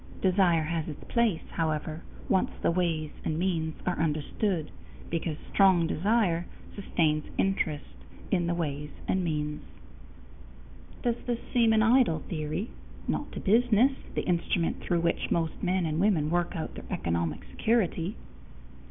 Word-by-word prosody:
Desire 180 -4 +3
has 160 0 -2
its 150 - -7
place, 230 -8 +1
however, 155 0 -2 0.3
once 190 -2 +2
the - - +4
ways 165 -3 0
and 155 - -1
means 165 -3 0
are 180 - 0
understood, 160 +3 -1 0.4
because 165 -2 -1 0.2
strong 190 -4 +5
desire 180 -1 +1 0.3
sustains 155 -6 +1
interest 165 -6 0 0.5
in 175 -4 +2
the 170 - +1
ways 150 -3 -3 0.2
and 185 0 +1
means. 150 -2 -2 1.4
Does 240 -1 +1
this 240 -1 +1 0.2
seem 230 -2 +5
an 220 0 +4
idle 230 - +4
theory? 155 +6 -2 0.4
Not - - -2
to - - -4
business, 235 +4 +4 0.2
the - - 0
instrument 170 -1 0
through 175 -2 0
which 170 0 0
most 165 -2 -1
men 185 -1 +1
and 155 0 -1
women 170 -6 +2
work 175 0 0
out 160 - -4
their - - -9
economic 85 -2 -1
security. 205 -5 +1
170 Hz, 140 wpm, -29 LUFS, 155-195 Hz, 1.4 s, strong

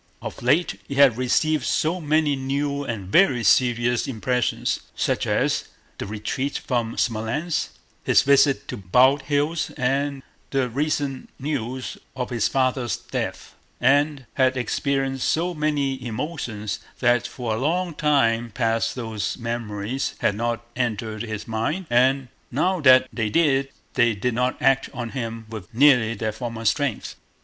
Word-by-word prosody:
Of - - -7
late 145 +9 +2
he 140 - -5
had 135 -4 +6
received 150 +5 +1
so 170 +4 0
many 155 -1 +2
new 140 +2 -2
and 105 -8 -5
very 135 - +4
serious 120 +1 +3
impressions—such 125 0 -1
as - - +1 0.3
the - - -4
retreat 110 +7 -3
from 120 -3 -2
Smolénsk, 120 +9 -1 0.3
his - - +4
visit 140 0 +4
to - - -4
Bald 125 +9 +4
Hills, 150 +3 0
and 135 +2 0 0.3
the 135 -2 0
recent 140 0 -2
news 130 -3 -4 0.2
of 125 -1 -4
his 115 -3 +1
father's 130 -4 0
death—and 140 +1 -1
had 130 -1 +2
experienced 135 +2 -1
so 175 +3 0
many 145 -4 -1
emotions, 120 -4 -4 0.2
that 120 -1 +2
for 120 -3 -4
a 110 - -2
long 170 +5 0
time 120 -7 +2
past 115 0 0
those 110 -4 -3
memories 115 +1 -3
had - - +1
not 120 +2 -2
entered 110 -3 -2
his 110 -2 -5
mind, 115 +12 -2
and 130 +2 +3 0.2
now 180 +8 +1
that 130 -2 +7
they 110 -1 -1
did, 135 -2 +2 0.2
they 120 -2 +3
did 125 +4 -1
not 125 +2 0
act 135 0 +2
on 120 -1 -4
him 115 -3 -5
with 110 -1 -9
nearly 125 -4 +5
their 110 -1 -2
former 115 +1 -6
strength. 140 +1 0
130 Hz, 140 wpm, -23 LUFS, 115-140 Hz, 0.3 s, that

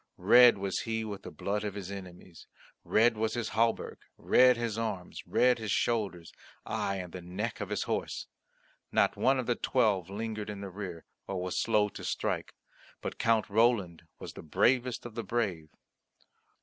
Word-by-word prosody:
Red 120 +5 +7
was 95 -1 -2
he 110 -1 -2
with 100 -2 -6
the - - -8
blood 105 +1 -3
of 105 -1 -4
his 100 -1 -6
enemies, 90 -3 -10 0.4
red 115 +2 +3
was 110 +1 -1
his 120 -2 -2
hauberk, 115 +1 0 0.2
red 125 -1 +5
his 115 -2 -2
arms, 105 -6 -4
red 125 -1 +3
his 110 -1 -5
shoulders, 100 -7 -1 0.3
aye, 100 - -1
and 90 -3 -6
the 90 - -6
neck 100 +7 -4
of 105 - -4
his 105 - -1
horse. - - -3 0.7
Not - - +3
one 135 +1 +3
of 130 - -2
the 120 - +2
Twelve 105 -8 +1
lingered 110 +1 -4
in 100 -1 -6
the 100 -1 -6
rear, 90 -4 -7 0.2
or 95 -2 -3
was 90 0 -3
slow 105 -2 +2
to - - -10
strike, - - -2 0.4
but - - -6
Count 115 -2 +2
Roland 100 -7 +1
was - - -8
the - - -9
bravest 125 - +1
of 120 - -7
the 115 0 -4
brave. 95 -9 -2
105 Hz, 175 wpm, -30 LUFS, 95-115 Hz, 0.7 s, Red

